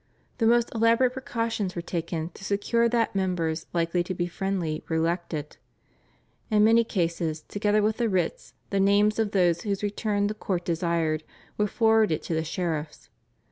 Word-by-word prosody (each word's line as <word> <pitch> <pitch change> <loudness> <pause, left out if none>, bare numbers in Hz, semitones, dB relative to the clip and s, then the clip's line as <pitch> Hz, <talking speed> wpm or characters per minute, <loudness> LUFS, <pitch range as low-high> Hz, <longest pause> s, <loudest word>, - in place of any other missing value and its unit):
The 225 - +3
most 235 0 +3
elaborate 230 +2 +3
precautions 230 -7 -2
were 170 - -2
taken 170 -1 -3
to 195 - -14
secure 230 +4 +1
that 230 -1 +1
members 175 -4 -1
likely 170 +1 +1
to 185 - -4
be 175 - -1
friendly 175 -3 -2
were 160 - 0
elected. 165 -2 -2 0.9
In 210 -2 +4
many 230 +2 +5
cases 170 -6 -1
together 205 +1 +1
with 215 +1 +1
the 235 -2 +1
writs 195 - -2 0.2
the 200 - +1
names 205 +2 +3
of 220 -2 +1
those 175 -4 +2
whose 200 -1 -2
return 205 0 0
the 210 - -1
court 185 -4 -3
desired 165 -2 0 0.3
were 210 - +1
forwarded 220 -7 +2
to - - -3
the 160 0 0
sheriffs. 160 -2 -4
195 Hz, 165 wpm, -26 LUFS, 170-215 Hz, 0.9 s, many